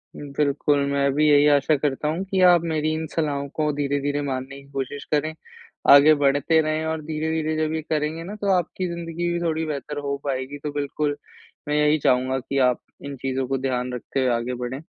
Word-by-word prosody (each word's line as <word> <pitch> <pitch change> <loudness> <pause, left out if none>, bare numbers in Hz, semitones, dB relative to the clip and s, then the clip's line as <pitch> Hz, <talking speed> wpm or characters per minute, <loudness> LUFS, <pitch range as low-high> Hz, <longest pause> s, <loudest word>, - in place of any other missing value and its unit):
बिल्कुल, 145 0 0
मैं 140 0 +2
भी 150 +2 +3
यही 145 0 +6
आशा 145 +2 +2
करता 145 +1 -1
हूँ 165 +5 -1
कि 195 0 -1
आप 175 -2 +4
मेरी 155 0 0
इन 160 0 -3
सलाहों 145 -3 -2
को 150 -1 +1
धीरे-धीरे 145 0 -1
मानने 135 -1 -4
की 140 - -19
कोशिश 140 +1 -4
करें, 155 +1 +1 0.6
आगे 145 +2 +9
बढ़ते 145 +3 +3
रहें। 155 0 -1
और 160 0 -2
धीरे-धीरे 155 0 -1
जब 155 0 0
ये 160 - -2
करेंगे 155 +1 -2
ना, 195 +5 -7
तो 205 -1 -4
आपकी 180 +1 -1
ज़िंदगी 170 0 -3
भी 170 - -1
थोड़ी 160 -1 -1
बेहतर 150 -1 -5
हो 140 - 0
पाएगी। 135 0 -3
तो 150 - -3
बिल्कुल, 145 0 -1 0.5
मैं 150 - 0
यही 150 +1 +3
चाहूँगा 130 +1 +2
कि 135 +2 -4
आप 125 - -3 0.2
इन 140 0 -5
चीज़ों 130 0 -2
को 135 +1 0
ध्यान 125 -1 -2
रखते 125 +2 -4
हुए 130 -1 +2
आगे 120 +2 -3
बढ़ें। 130 +3 -4
145 Hz, 200 wpm, -23 LUFS, 140-155 Hz, 0.6 s, आगे